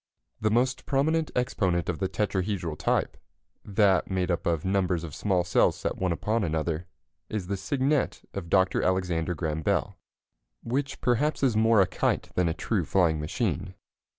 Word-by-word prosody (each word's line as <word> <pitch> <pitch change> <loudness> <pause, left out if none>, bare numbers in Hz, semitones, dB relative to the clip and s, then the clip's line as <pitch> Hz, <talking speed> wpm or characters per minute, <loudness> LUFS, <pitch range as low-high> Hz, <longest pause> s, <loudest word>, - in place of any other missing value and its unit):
The 110 - +1
most 125 +4 +1
prominent 155 +3 +1
exponent 95 -9 0
of 90 - -2
the 95 -2 -1
tetrahedral 95 -4 -1
type - - 0 0.5
that 100 -3 +2
made 95 -1 0
up 85 - -1
of 85 -1 0
numbers 90 -3 +1
of 80 -4 -7
small 95 0 +1
cells 90 - +2
set - - -2
one 95 -1 -1
upon 110 +6 0
another 80 0 -2 0.4
is 105 -4 -3
the 100 +2 -2
Cygnet 135 +7 0
of 90 -4 -5
Dr. 95 0 +3
Alexander 90 -2 0
Graham 80 -1 -2
Bell, - - -1 0.6
which 135 +3 -2
perhaps 140 +5 +1
is 125 -5 +3
more 110 -1 +5
a - - +5
kite - - -1
than 90 -2 +2
a - - -1
true 100 -1 -1
flying 80 -2 +2
machine. 90 +3 -2
95 Hz, 165 wpm, -27 LUFS, 85-110 Hz, 0.6 s, more